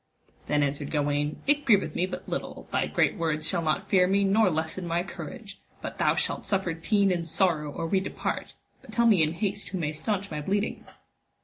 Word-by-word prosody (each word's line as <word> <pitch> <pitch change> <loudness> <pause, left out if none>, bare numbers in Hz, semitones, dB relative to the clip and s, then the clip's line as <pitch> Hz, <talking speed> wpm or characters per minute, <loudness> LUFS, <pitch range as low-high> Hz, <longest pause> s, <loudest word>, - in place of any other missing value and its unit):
Then 150 0 +2
answered 140 0 -2
Gawaine, 145 0 -1
it 290 +1 +3
grieveth 200 - +3
me 180 - 0
but - - -7
little, - - -5
thy - - +1
great - - +1
words 155 -2 0
shall 170 - +1
not 165 +5 0
fear 185 -2 +4
me 200 +1 +3
nor 200 +1 +4
lessen 160 +2 -2
my 170 +1 0
courage, 205 +1 -9 0.2
but - - -7
thou - - +3
shalt - - -1
suffer 190 -4 0
teen 200 +4 +2
and 170 -2 -1
sorrow 160 -4 +1
or 165 - -4
we 190 +4 +2
depart, 190 - -4 0.3
but - - -13
tell 235 - +2
me 210 -7 +5
in 155 0 +2
haste 200 +1 -2
who 190 - -3
may 155 -4 -1
staunch 195 +5 -2
my 150 -1 -3
bleeding. 200 +7 -2
180 Hz, 205 wpm, -27 LUFS, 155-200 Hz, 0.3 s, me